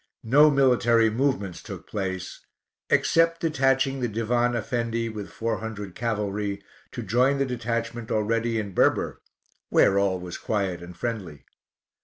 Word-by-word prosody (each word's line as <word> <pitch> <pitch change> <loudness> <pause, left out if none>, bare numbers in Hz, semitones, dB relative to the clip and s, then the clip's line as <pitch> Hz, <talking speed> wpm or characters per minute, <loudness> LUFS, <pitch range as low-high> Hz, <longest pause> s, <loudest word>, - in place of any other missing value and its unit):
No 145 +7 +6
military 120 -5 +4
movements 120 -7 -1
took - - -9
place, 95 -3 -5 0.5
except 165 0 +3
detaching 135 -3 +1
the 125 - 0
Divan 120 +2 0
Effendi 115 0 -2
with 105 -2 -7
four 115 0 -2
hundred 105 -4 -6
cavalry, 105 -3 -2 0.3
to 120 - -5
join 125 +7 +2
the 140 - +1
detachment 115 -2 -3
already 115 +2 0
in 100 -3 -3
Berber, - - +1 0.5
where 100 - +4
all 95 -2 +1
was 90 -1 -7
quiet 95 -5 -2
and 85 0 -10
friendly. 95 - -5
115 Hz, 135 wpm, -25 LUFS, 100-125 Hz, 0.5 s, No